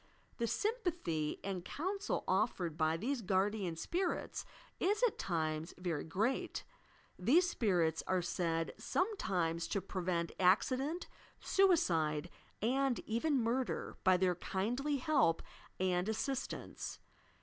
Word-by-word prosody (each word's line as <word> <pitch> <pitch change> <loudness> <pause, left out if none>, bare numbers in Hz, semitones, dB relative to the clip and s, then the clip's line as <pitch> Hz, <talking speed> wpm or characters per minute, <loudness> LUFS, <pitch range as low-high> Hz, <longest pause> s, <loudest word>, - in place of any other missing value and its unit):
The 235 - +1
sympathy 350 - -1
and 190 -3 -3
counsel 385 - -2
offered 185 -5 +1
by 160 0 +2
these 250 +7 -1
Guardian 195 -2 +1
Spirits 345 - -2 0.3
is, 415 +5 +1
at 485 - +3
times, 160 -2 -1
very 175 -5 -2
great; 215 +11 -1 0.6
these 305 - +5
spirits 175 - +1
are 185 -1 +1
said 165 -2 -1
sometimes 175 - 0
to 200 - 0
prevent 180 -3 -2
accident, 260 - +2 0.3
suicide 175 - +3 0.3
and 265 +2 +2
even 250 +4 +1
murder 245 +3 -1
by 185 -1 +6
their 180 0 +3
kindly 245 - -1
help 255 - +2 0.4
and 180 +1 +1
assistance. 260 +4 -3
195 Hz, 110 wpm, -35 LUFS, 170-275 Hz, 0.6 s, by